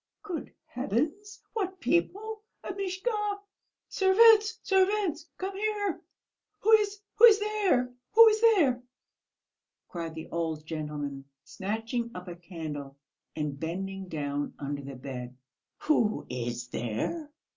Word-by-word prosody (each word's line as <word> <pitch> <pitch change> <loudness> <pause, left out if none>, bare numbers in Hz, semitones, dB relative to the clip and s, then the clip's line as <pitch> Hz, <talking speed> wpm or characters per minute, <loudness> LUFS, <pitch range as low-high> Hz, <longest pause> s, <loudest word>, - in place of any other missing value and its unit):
"Good 355 -8 -5
heavens, 300 - -2
what 380 -4 -2
people? 415 +6 0 0.2
Amishka.... 400 +2 -2 0.5
Servants, 435 +3 +5
servants, 385 -4 +1
come 385 +1 -4
here! 410 -2 -1 0.6
Who 440 - +3
is 415 -2 +5 0.4
there, 400 -13 +1 0.2
who 455 +1 +10
is 435 0 0
there?" 335 - +4 1.1
cried 165 -2 -5
the 160 - -7
old 160 -2 -2
gentleman, 150 -3 -4 0.2
snatching 225 +4 -3
up 180 +1 -7
a 175 - -6
candle 155 -6 -7 0.4
and 150 -3 -3
bending 190 +4 -4
down 145 -3 -3
under 140 0 -4
the 140 0 -8
bed. 125 -1 -7 0.4
"Who 230 -8 +2
is 120 -1 -4
there?" 120 - -3
250 Hz, 110 wpm, -29 LUFS, -, 1.1 s, who